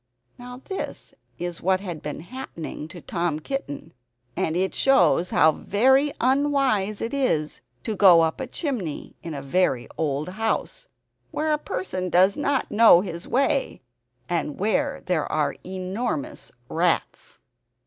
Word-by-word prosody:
Now, 250 +1 -10
this 385 - -6 0.2
is 175 -1 -5
what 185 +1 +2
had 175 -5 -6
been 150 0 -5
happening 170 - -7
to 175 +1 -11
Tom 170 -2 -2
Kitten, 155 - -5 0.4
and 160 - -1
it 190 +2 0
shows 180 - +3
how 160 - +5
very 265 - +3
unwise 260 -6 +1
it 230 - -3
is 205 - 0 0.2
to 220 - -2
go 185 -4 +7
up 160 -1 0
a 260 - -3
chimney 235 - -4
in 165 -3 -6
a 140 - -6
very 135 -4 +1
old 150 +1 -1
house, 220 - -2 0.4
where 310 0 0
a 300 - 0
person 185 -6 -4
does 185 +3 +4
not 285 -2 -1
know 210 -5 +7
his 170 -3 -6
way, 275 - 0 0.4
and 165 -4 -2
where 275 +8 0
there 175 -4 -1
are 155 -1 0
enormous 185 - -4 0.2
rats. 170 +4 -1
185 Hz, 140 wpm, -24 LUFS, 165-255 Hz, 0.4 s, go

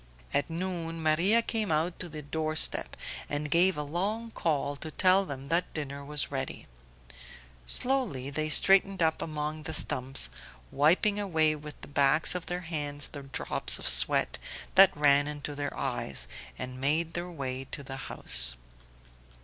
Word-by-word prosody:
At 145 - +1
noon 165 -1 -4
Maria 180 +9 +4
came 220 -5 -1
out 160 +3 -1
to 180 - -5
the 155 -1 -8
door 155 +2 -3
step - - 0 0.3
and 145 0 -3
gave 180 +1 +3
a 150 - -2
long 205 +9 -3
call 145 -6 -1
to 160 - -7
tell 185 +4 +3
them 135 0 -7
that 170 +2 +1
dinner 140 -2 -5
was 150 0 -1
ready. 135 -1 -5 1.0
Slowly 240 - 0
they 155 +2 -2
straightened 195 +3 +4
up 160 0 +1
among 155 0 -4
the 150 - -5
stumps, 130 - +2 0.4
wiping 180 +8 +3
away 160 -6 +1
with 150 0 -10
the - - -8
backs 145 +2 +3
of 180 -1 -5
their 175 0 -3
hands 145 -4 -4
the 145 - -9
drops 135 -1 0
of - - -5
sweat - - +4 0.3
that 190 -3 +7
ran 145 -1 +4
into 150 0 -6
their 145 0 -5
eyes, 70 - -2 0.3
and 125 0 -6
made 160 +4 0
their 175 +2 -4
way 135 -5 -5
to 140 - -6
the 135 0 -8
house. - - +4
155 Hz, 160 wpm, -29 LUFS, 140-175 Hz, 1.0 s, that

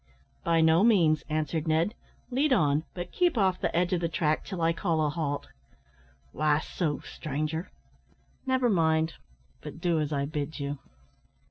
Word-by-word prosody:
"By 165 -1 +3
no 160 +3 +5
means," 170 -9 +4
answered 155 +1 -1
Ned, 160 +6 +2 0.4
"lead 275 +4 +1
on; 150 - +3
but 175 -1 -5
keep 350 -7 +1
off 190 -3 +2
the - - -1
edge 180 +1 +2
of 175 - 0
the 170 - 0
track 155 -1 0
till 190 -3 -6
I 165 0 +2
call 160 -2 0
a - - +1
halt." 145 -2 -3 0.8
"Why 150 -1 +2
so, 155 -2 -2
stranger?" 155 +3 -4 0.8
"Never 260 -1 +2
mind, 160 -5 +2 0.5
but 150 +1 -9
do 170 -1 +1
as 150 -1 -1
I 140 -1 0
bid 150 +1 -4
you." 140 0 -3
160 Hz, 160 wpm, -28 LUFS, 155-180 Hz, 0.8 s, no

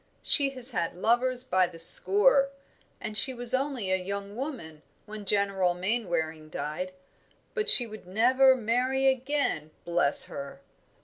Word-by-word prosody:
She 280 -2 +3
has 255 +1 -6
had 170 -7 -3
lovers 245 +6 0
by 185 -6 +1
the 170 -1 -13
score, 205 +11 +3 0.5
and 215 - -7
she 260 +4 +6
was 245 0 -1
only 260 -7 -2
a - - +3
young 200 +2 -7
woman 230 - -8 0.2
when 210 -1 -10
General 195 -3 0
Mainwaring 175 -6 -4
died; 180 +5 -6 0.6
but 435 -1 0
she 245 - +8
would 215 -4 -13
never 255 +7 +3
marry 255 +3 -1
again, 265 - -1 0.2
bless 170 -4 +4
her!" 140 0 -9
215 Hz, 140 wpm, -26 LUFS, 180-255 Hz, 0.6 s, she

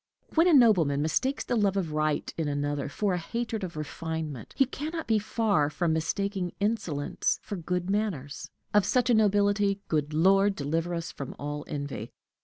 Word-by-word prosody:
When 330 +2 +5
a 350 - +5
nobleman 185 - +5
mistakes 260 - 0
the 245 - -1
love 200 -3 +2
of 175 -5 -1
right 155 0 0
in 160 -2 -2
another 145 0 -2
for 200 +5 0
a 180 - 0
hatred 230 +3 -3
of 170 -4 -5
refinement, 155 -3 -5
he 270 - +5
can 285 +4 -5
not 325 -1 -3
be 220 -1 +2
far 205 -8 +1
from 160 +1 0
mistaking 180 +3 -1
insolence 200 -9 0
for 205 - -5
good 180 0 -2
manners. 190 -9 -2 0.2
Of 205 -1 +5
such 250 +3 +2
a - - +5
nobility, 205 -1 +3
good 150 -1 0
Lord, 195 +5 +4
deliver 165 +4 -1
us 165 0 -4
from 140 - -7
all 145 +1 -5
envy! 140 -6 -5
180 Hz, 180 wpm, -28 LUFS, 150-210 Hz, 0.2 s, When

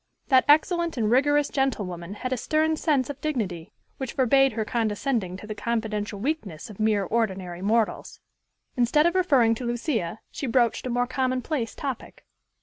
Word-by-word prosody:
That 260 -2 +5
excellent 335 +2 +3
and 220 -2 +1
rigorous 290 +3 +3
gentlewoman 200 -9 -2
had 255 +4 -3
a - - +1
stern 315 +5 +1
sense 290 -4 +1
of 280 - -12
dignity, 205 - -3 0.3
which 265 -3 -5
forbade 270 0 +4
her 220 -1 -2
condescending 215 -3 -1
to 205 - -10
the 215 - -5
confidential 215 -2 -3
weakness 220 - -4
of 205 - -14
mere 215 -2 +2
ordinary 190 -4 -2
mortals. 220 +3 0 0.6
Instead 250 +5 +3
of 345 - +3
referring 275 -12 +4
to 230 - -5
Lucia, 235 - -2
she 275 - -4
broached 240 0 +1
a - - -3
more 245 0 +1
commonplace 255 0 -2
topic. 270 -5 -6
240 Hz, 160 wpm, -25 LUFS, 215-275 Hz, 0.6 s, That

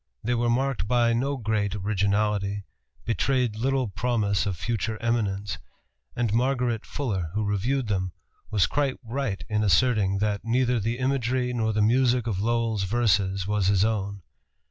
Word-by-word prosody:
They 120 - 0
were 120 0 +1
marked 130 -3 0
by 120 0 +3
no 135 +4 0
great 105 -4 -1
originality, 100 0 0 0.4
betrayed 125 -1 +1
little 130 +2 0
promise 100 0 0
of 95 -4 -2
future 110 +2 -2
eminence, 105 -6 -1 0.6
and 120 -4 0
Margaret 125 -2 0
Fuller, 100 - -2
who 105 0 0
reviewed 115 +6 0
them, 95 -3 -1 0.4
was 100 -4 +3
quite 140 -2 0
right 115 -3 -3
in 105 0 0
asserting 100 +1 +3
that 105 0 0
"neither 125 +1 +1
the 115 +3 -1
imagery 130 -1 0
nor 110 -2 0
the 105 0 +1
music 125 +1 +3
of 100 -5 -1
Lowell's 115 -1 0
verses 95 -3 +1
was 105 -2 0
his 100 0 +4
own." 100 -3 -2
110 Hz, 150 wpm, -26 LUFS, 100-125 Hz, 0.6 s, his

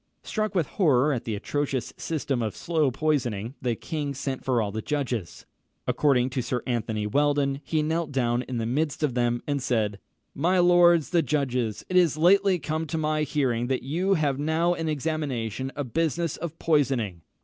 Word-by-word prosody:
Struck 215 -1 -2
with 170 -4 +2
horror 150 - +2
at 120 - -3
the 110 - -2
atrocious 135 +3 -2
system 145 -5 -2
of 110 -2 -2
slow 160 -4 +1
poisoning, 125 -6 -1
the 120 -2 0
king 145 +1 -4
sent 130 0 -4
for 125 -3 +1
all 105 -2 -1
the 110 +2 -3
judges. 125 - -3 0.4
According 130 -3 +2
to 130 - -1
Sir 125 +1 -2
Anthony 110 -4 -2
Weldon, 140 +3 +1
he 155 -2 0
knelt 160 0 -1
down 120 -2 +1
in 125 -1 -5
the 115 - -1
midst 150 +5 -1
of 145 -5 +1
them, 120 -1 0
and 145 -1 -1
said, 110 -5 0 0.3
"My 175 +6 +1
lords 175 -2 +5
the 175 -2 +4
judges, 125 -8 -1
it 185 - +1
is 170 -5 +4
lately 190 +3 +4
come 155 0 -3
to 160 - -3
my 155 0 0
hearing 130 -5 0
that 130 0 -1
you 180 +8 +1
have 145 -4 0
now 160 +4 +1
in 165 -2 -3
examination 135 -5 -2
a 145 - -2
business 165 +4 -1
of 165 -1 -6
poisoning. 130 - +1
145 Hz, 180 wpm, -26 LUFS, 125-160 Hz, 0.4 s, lords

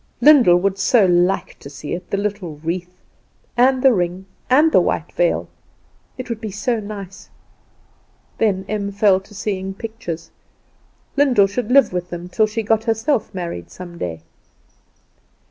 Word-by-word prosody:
Lyndall 270 -12 +7
would 195 +2 -1
so 220 0 +4
like 180 +1 +1
to 140 - -10
see 145 +1 -7
it 175 +1 -6
the 200 - -1
little 200 -6 -3
wreath, 180 +2 -4 0.6
and 255 +1 +3
the 265 -2 +6
ring, 180 -1 -2 0.2
and 300 +5 +5
the - - +5
white - - -2
veil! - - 0 0.7
It 255 - -6
would 235 -2 -5
be 220 - -4
so 215 +4 -1
nice! 200 -2 -9 1.1
Then 195 -4 +1
Em 200 -1 -2
fell 200 -1 +3
to 200 +2 -17
seeing 195 -1 -3
pictures. 185 -8 -7 0.8
Lyndall 265 -8 +4
should 215 +4 -3
live 275 -7 +5
with 180 0 -3
them 175 0 -7
till 215 +3 +2
she 220 +2 -3
herself 225 +3 +1
got - - -20
married 170 - -5
some 175 -2 -10
day. 80 -2 -5
200 Hz, 155 wpm, -20 LUFS, 180-225 Hz, 1.1 s, Lyndall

